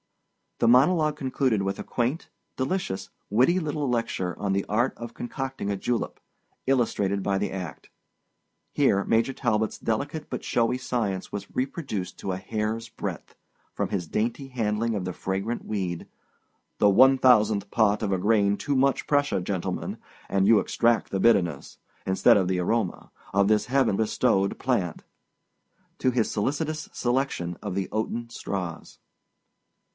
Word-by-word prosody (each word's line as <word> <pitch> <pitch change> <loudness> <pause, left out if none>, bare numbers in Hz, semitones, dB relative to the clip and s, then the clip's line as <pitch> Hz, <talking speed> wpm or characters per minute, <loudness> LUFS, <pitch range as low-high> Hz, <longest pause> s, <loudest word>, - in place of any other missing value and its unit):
The - - +2
monologue 150 +5 +4
concluded 130 -6 0
with 95 0 -2
a - - -5
quaint, 125 +7 -2 0.3
delicious, 130 - -2 0.2
witty 130 - +4
little 150 -3 -2
lecture 115 -7 -1
on 100 -2 0
the 100 0 0
art 120 +5 +1
of 120 -1 -7
concocting 130 -4 -4
a 100 - -1
julep, 120 +4 -2 0.5
illustrated 105 -7 +1
by 100 -1 +1
the 100 - -1
act. 90 -5 -7 0.8
Here 105 -9 +3
Major 115 +6 +2
Talbot's 110 -4 0
delicate 145 +7 -2
but 125 - -4
showy 120 +1 +1
science 110 -7 -2
was 100 -1 -5
reproduced 130 - -3
to 95 - -3
a 90 - -2
hair's 110 +3 -3
breadth—from - - -7
his 90 -4 -2
dainty 115 - -2
handling 115 -2 -1
of 95 -3 -2
the 90 - -3
fragrant 95 +7 -3
weed—"the 95 +1 -3
one 130 +7 +6
thousandth 105 -5 +4
part 105 -2 +2
of 105 -3 -1
a 95 - +2
grain 100 0 +3
too 145 - -1
much 135 +1 +2
pressure, 145 -8 +2
gentlemen, 90 0 -3 0.3
and 95 0 +2
you 110 -1 +7
extract 115 -1 +1
the 95 - -1
bitterness, 90 -9 +2 0.3
instead 95 +2 +5
of 95 -3 +1
the 95 0 0
aroma, 100 +1 -1 0.2
of 100 0 +4
this 105 0 +2
heaven 130 -6 +2
bestowed 100 -2 +1
plant"—to 125 +3 -4
his 120 -3 +1
solicitous 155 +7 -2
selection 120 -9 -1
of 100 -3 -3
the 95 -2 -1
oaten 115 +2 -2
straws. 90 -7 -5
110 Hz, 145 wpm, -26 LUFS, 100-130 Hz, 0.8 s, you